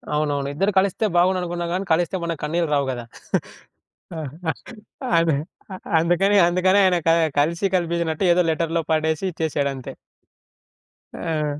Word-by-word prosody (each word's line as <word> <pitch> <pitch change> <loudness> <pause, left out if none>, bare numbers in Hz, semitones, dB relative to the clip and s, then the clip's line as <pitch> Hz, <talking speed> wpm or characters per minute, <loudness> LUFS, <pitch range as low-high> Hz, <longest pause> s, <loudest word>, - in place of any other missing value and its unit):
అవునవును. 145 -2 0
ఇద్దరు 195 +7 +1
కలిస్తే 195 +3 0
బాగుండుననుకున్నాం 175 -1 +1
కానీ 190 +2 -2
కలిస్తే 175 +3 0
మనకు 165 -2 -3
కన్నీళ్ళు 165 +1 0
రావు 140 -1 +2
గదా! 120 -2 -6 2.1
అందు 165 -3 +3 0.6
అందుకని 175 +5 +2
అందుకని 185 +2 +2
ఆయన 185 -2 +4
క - - +6 0.3
కలిసి 165 +6 +1
కలిపించినట్టు 170 -1 -1
ఏదో 175 +1 +4
లెటర్‌లో 165 +1 0
పడేసి 160 +1 0
ఇచ్చేసాడంతే. 140 -5 -3 1.2
ఆ! 150 -3 -2
165 Hz, 115 wpm, -22 LUFS, 155-180 Hz, 2.1 s, క